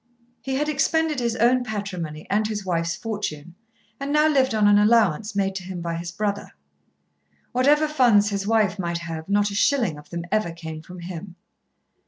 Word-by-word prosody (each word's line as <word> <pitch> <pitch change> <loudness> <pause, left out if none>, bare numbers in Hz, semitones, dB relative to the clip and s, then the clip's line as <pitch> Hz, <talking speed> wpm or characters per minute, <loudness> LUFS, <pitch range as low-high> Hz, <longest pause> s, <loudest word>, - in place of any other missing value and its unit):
He 265 0 -3
had 295 +3 0
expended 305 0 +1
his 235 -2 -1
own 245 +2 +3
patrimony 185 -8 -5
and 210 +2 +1
his 210 -2 -4
wife's 170 -2 -1
fortune, 175 -6 -5 0.5
and 275 +1 -3
now 300 +1 +4
lived 265 -6 +2
on 210 -1 +4
an 205 0 +6
allowance 210 -2 +3
made 195 -1 0
to 190 - -7
him 185 0 -6
by 170 -1 -3
his 170 0 -5
brother. 205 +2 -3 1.0
Whatever 290 +5 +3
funds 240 -9 +4
his 200 0 -2
wife 210 -3 +2
might 170 -2 -2
have 165 0 -7
not 205 0 +2
a - - -5
shilling 205 - +1
of 150 - -16
them 170 0 -5
ever 215 -5 0
came 160 -2 -8
from 180 +2 -11
him. 175 +1 -8
205 Hz, 185 wpm, -24 LUFS, 170-235 Hz, 1.0 s, an